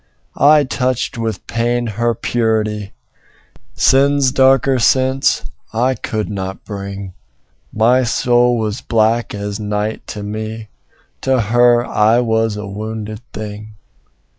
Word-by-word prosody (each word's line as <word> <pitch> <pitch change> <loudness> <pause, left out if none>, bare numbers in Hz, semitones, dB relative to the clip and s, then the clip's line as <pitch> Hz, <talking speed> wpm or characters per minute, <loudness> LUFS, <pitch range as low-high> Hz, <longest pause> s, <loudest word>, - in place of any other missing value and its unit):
I 150 +1 +5
touched 130 -2 -2
with 110 -4 -3
pain 120 +1 -1
her 115 +1 -1
purity; 110 -3 -1 0.8
Sin's 135 +2 +3
darker 135 0 +3
sense 130 +2 +2 0.3
I 125 +4 +1
could 110 -3 -3
not 95 -1 -5
bring: 100 -2 -7 0.6
My 120 +4 +3
soul 120 0 +2
was 110 +1 -3
black 115 0 +1
as 100 0 -4
night 105 +1 -3
to 105 -2 -6
me: 110 +1 -6 0.5
To 130 -1 +1
her 120 +2 +3
I 110 +3 +3
was 110 -2 0
a 105 - -5
wounded 110 +2 -6
thing. 105 0 -8
110 Hz, 115 wpm, -17 LUFS, 105-120 Hz, 0.8 s, I